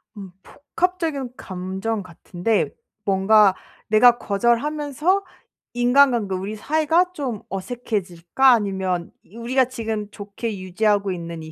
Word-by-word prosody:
음 195 Hz, -3 st, -9 dB
복합적인 310 Hz, -4 st, -3 dB
감정 190 Hz, +3 st, -4 dB
같은데 180 Hz, +1 st, -2 dB, 0.4 s
뭔가 195 Hz, 0 st, +4 dB, 0.3 s
내가 235 Hz, +3 st, +6 dB
거절하면서 290 Hz, -, 0 dB, 0.5 s
인간관계 245 Hz, -4 st, +3 dB
'우리 195 Hz, +4 st, -4 dB
사이가 315 Hz, -, +1 dB
좀 260 Hz, -, -4 dB
어색해질까? 195 Hz, +1 st, 0 dB
아니면 190 Hz, -6 st, 0 dB
이 215 Hz, -, -16 dB
우리가 255 Hz, +3 st, +1 dB
지금 225 Hz, -4 st, -4 dB
좋게 205 Hz, +1 st, -6 dB
유지하고 200 Hz, +1 st, 0 dB
있는 170 Hz, -2 st, -6 dB
이 160 Hz, -, -10 dB
220 Hz, 270 characters per minute, -22 LUFS, 190-260 Hz, 0.5 s, 내가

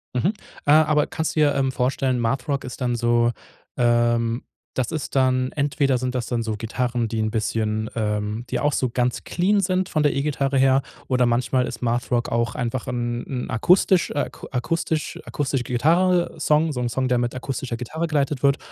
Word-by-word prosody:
Mhm, 170 Hz, -, +2 dB, 0.3 s
äh, 145 Hz, -, +4 dB
aber 150 Hz, -1 st, +4 dB
kannst 160 Hz, -, -3 dB
du -, -, +1 dB
dir, 145 Hz, -1 st, +3 dB
ähm, 135 Hz, -1 st, +1 dB
vorstellen. 130 Hz, 0 st, 0 dB
Math-Rock 130 Hz, +4 st, -1 dB
ist 125 Hz, +1 st, -8 dB
dann 120 Hz, -1 st, 0 dB
so, 120 Hz, 0 st, +2 dB, 0.5 s
ähm 120 Hz, 0 st, +2 dB, 0.3 s
das 130 Hz, -2 st, -1 dB
ist 155 Hz, -3 st, -4 dB
dann 130 Hz, -1 st, +2 dB
entweder 140 Hz, -2 st, +1 dB
sind 125 Hz, 0 st, -2 dB
das 125 Hz, -2 st, -2 dB
dann 120 Hz, -2 st, -1 dB
so 110 Hz, -1 st, -2 dB
Gitarren, 120 Hz, +2 st, -2 dB
die 110 Hz, 0 st, -3 dB
'n 110 Hz, 0 st, 0 dB
bisschen, 110 Hz, -1 st, -1 dB
ähm 105 Hz, +1 st, -2 dB
die -, -, 0 dB
auch 145 Hz, 0 st, +1 dB
so 130 Hz, -3 st, 0 dB
ganz 125 Hz, 0 st, 0 dB
clean 200 Hz, +4 st, +1 dB
sind 185 Hz, -1 st, 0 dB
von 155 Hz, -2 st, +1 dB
der 145 Hz, -, +3 dB
E-Gitarre 140 Hz, -1 st, 0 dB
her 135 Hz, 0 st, +4 dB, 0.2 s
oder 125 Hz, -1 st, +2 dB
manchmal 125 Hz, +2 st, +1 dB
ist -, -, -7 dB
Math-Rock 120 Hz, 0 st, 0 dB
auch 115 Hz, -1 st, 0 dB
einfach 120 Hz, 0 st, -3 dB
'n 120 Hz, -1 st, -3 dB
'n 125 Hz, -2 st, -4 dB
akustisch 180 Hz, +7 st, +3 dB
äh, 145 Hz, -, 0 dB
aku -, -, -11 dB
akustisch 155 Hz, +4 st, -2 dB
akustische 135 Hz, -3 st, -2 dB
Gitarrensong, 160 Hz, +3 st, +2 dB
so 125 Hz, -, -3 dB
'n 120 Hz, -1 st, -1 dB
Song, 130 Hz, +2 st, -1 dB
der 125 Hz, -1 st, +2 dB
mit 120 Hz, 0 st, -1 dB
akustischer 130 Hz, -1 st, -4 dB
Gitarre 155 Hz, +8 st, -3 dB
geleitet 145 Hz, -3 st, -1 dB
wird 140 Hz, 0 st, +4 dB
130 Hz, 190 wpm, -23 LUFS, 120-145 Hz, 0.5 s, äh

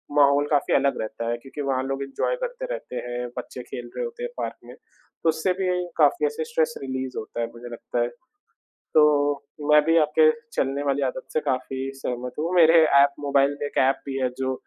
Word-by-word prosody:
माहौल 145 Hz, 0 st, +5 dB
काफ़ी 145 Hz, -1 st, +2 dB
अलग 140 Hz, -, +2 dB
रहता 115 Hz, +1 st, -4 dB
है 120 Hz, -, -1 dB
क्योंकि 135 Hz, +4 st, -8 dB
वहाँ 135 Hz, -2 st, 0 dB
लोग 135 Hz, +1 st, -3 dB
एन्जॉय 135 Hz, -, -1 dB
करते -, -, -4 dB
रहते -, -, -6 dB
हैं, 120 Hz, 0 st, -3 dB
बच्चे 125 Hz, 0 st, -6 dB
खेल 120 Hz, 0 st, -8 dB
रहे -, -, -2 dB
होते 470 Hz, 0 st, -7 dB
हैं 485 Hz, -, -2 dB
पार्क -, -, -3 dB
में, -, -, -11 dB, 0.5 s
तो 165 Hz, -, +4 dB
उससे 160 Hz, +3 st, +1 dB
भी 185 Hz, 0 st, -1 dB, 0.3 s
काफ़ी 370 Hz, +5 st, +4 dB
ऐसे 460 Hz, +1 st, -2 dB
स्ट्रेस 475 Hz, 0 st, 0 dB
रिलीज़ 130 Hz, -1 st, -4 dB
होता 120 Hz, -, -5 dB
है 115 Hz, -, -1 dB
मुझे 120 Hz, +1 st, -10 dB
लगता 120 Hz, +1 st, -3 dB
है। 120 Hz, -, +2 dB, 0.9 s
तो 145 Hz, -2 st, +4 dB, 0.3 s
मैं 150 Hz, 0 st, +8 dB
भी 165 Hz, +1 st, +3 dB
आपके 155 Hz, 0 st, +5 dB, 0.2 s
चलने 135 Hz, +1 st, -1 dB
वाली 140 Hz, 0 st, 0 dB
आदत 130 Hz, 0 st, -5 dB
से 155 Hz, -, +1 dB
काफ़ी 130 Hz, 0 st, -2 dB
सहमत 125 Hz, -2 st, -4 dB
हूँ, 165 Hz, +4 st, -1 dB
मेरे 165 Hz, -1 st, +7 dB, 0.2 s
ऐप 140 Hz, 0 st, +3 dB
मोबाइल 140 Hz, 0 st, +2 dB
में 145 Hz, -, -1 dB
एक -, -, -4 dB
ऐप 135 Hz, -, 0 dB
भी 135 Hz, -1 st, -4 dB
है 130 Hz, -, +2 dB
जो 130 Hz, 0 st, -1 dB
140 Hz, 210 wpm, -24 LUFS, 130-160 Hz, 0.9 s, मैं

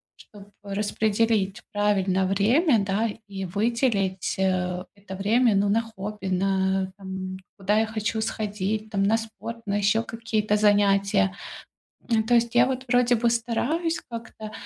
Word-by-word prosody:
чтобы 205 Hz, -2 st, -16 dB
распределить 205 Hz, 0 st, 0 dB
правильно 195 Hz, -2 st, +1 dB
время, 230 Hz, -, +3 dB
да, 210 Hz, +4 st, 0 dB, 0.2 s
и 195 Hz, -1 st, -5 dB
выделить, 200 Hz, -1 st, 0 dB
э, 180 Hz, -1 st, 0 dB
это 200 Hz, -1 st, -9 dB
время, 220 Hz, +3 st, +3 dB
ну, 200 Hz, +1 st, +2 dB
на 225 Hz, +3 st, +3 dB
хобби, 210 Hz, -3 st, -7 dB
на, 190 Hz, 0 st, 0 dB
там, 190 Hz, -1 st, -6 dB, 0.2 s
куда 205 Hz, +2 st, +1 dB
я 220 Hz, -, +1 dB
хочу 220 Hz, 0 st, -2 dB
сходить, 210 Hz, -1 st, -2 dB
там, 195 Hz, -2 st, +1 dB
на 220 Hz, +3 st, +3 dB
спорт, 230 Hz, +1 st, -7 dB
на 205 Hz, 0 st, 0 dB
ещё 205 Hz, +3 st, +2 dB
какие-то 220 Hz, -2 st, -1 dB
занятия. 200 Hz, -, +3 dB, 1.0 s
То 245 Hz, -, +4 dB
есть 235 Hz, 0 st, +2 dB
я, 240 Hz, +1 st, +6 dB
вот, 260 Hz, 0 st, -3 dB
вроде 245 Hz, -1 st, +3 dB
бы, 235 Hz, +1 st, +2 dB
стараюсь 250 Hz, +9 st, -1 dB
как-то 225 Hz, -2 st, -8 dB
210 Hz, 140 wpm, -25 LUFS, 195-230 Hz, 1.0 s, я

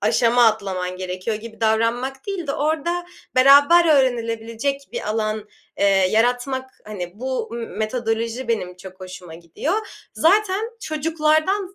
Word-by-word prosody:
aşama 235 Hz, +3 st, +3 dB
atlaman 190 Hz, -4 st, -1 dB
gerekiyor 185 Hz, +4 st, -3 dB
gibi 225 Hz, +1 st, -11 dB
davranmak 230 Hz, +4 st, 0 dB
değil 385 Hz, -5 st, -4 dB
de 275 Hz, -, -1 dB
orada 320 Hz, +4 st, -1 dB, 0.3 s
beraber 285 Hz, +6 st, +7 dB
öğrenilebilecek 240 Hz, +2 st, -1 dB
bir -, -, -4 dB
alan, 215 Hz, -1 st, -2 dB, 0.3 s
eee, -, -, +2 dB, 0.3 s
yaratmak. 250 Hz, +3 st, 0 dB
Hani, 180 Hz, -5 st, -6 dB
bu, 260 Hz, 0 st, -2 dB
mı 230 Hz, 0 st, -5 dB
metodoloji 230 Hz, +2 st, -3 dB
benim 180 Hz, -6 st, -2 dB
çok 185 Hz, +1 st, -12 dB
hoşuma 185 Hz, -3 st, -9 dB
gidiyor. 305 Hz, -, -3 dB, 0.3 s
Zaten 410 Hz, +5 st, +2 dB
çocuklardan, 315 Hz, +5 st, 0 dB
235 Hz, 125 wpm, -21 LUFS, 215-295 Hz, 0.3 s, beraber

